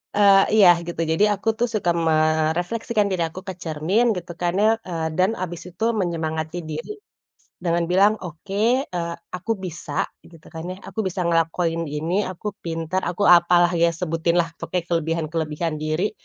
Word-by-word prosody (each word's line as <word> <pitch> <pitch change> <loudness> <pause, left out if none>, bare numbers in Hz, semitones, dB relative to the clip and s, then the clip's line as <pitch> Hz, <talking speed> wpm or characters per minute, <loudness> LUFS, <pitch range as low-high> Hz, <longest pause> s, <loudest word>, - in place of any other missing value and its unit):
eee, 200 -1 +6
iya, 205 -4 +7 0.2
gitu. 170 -1 -3
Jadi 160 +6 +2
aku, 200 +2 -7
tuh, 240 - +2
suka 185 -5 +1 0.2
merefleksikan 160 +8 +1
diri 180 -3 0
aku 160 +3 -9
ke 190 - -3
cermin 165 +9 +1
gitu, 175 -1 -6
kan, 175 -1 +1
ya, 215 - +5 0.2
eee, 165 -2 -2
dan 185 +1 +4
habis 175 -1 -4
itu 180 +4 -7
menyemangati 160 -5 -2
diri, 155 - -5 0.7
dengan 170 0 +2
bilang, 200 +3 +5
"Oke, 200 - 0
eee, 170 -6 -4 0.2
aku 180 +5 -3
bisa," 155 -4 -3 0.3
gitu, 165 -2 -16
kan 165 +1 -6
ya, 185 - -4
"aku - - -7
bisa 185 0 -2
ngelakuin 165 0 0
ini, 165 +8 -1
aku 185 +3 -5
pintar, 165 +2 -2
aku 180 +3 -2
apalah." 175 -1 +6
ya, 170 0 +3
sebutinlah 165 0 0
pokoknya 180 -2 -2
kelebihan 165 -1 0
kelebihan 160 0 -2
diri, 155 +6 -1
175 Hz, 160 wpm, -23 LUFS, 165-185 Hz, 0.7 s, iya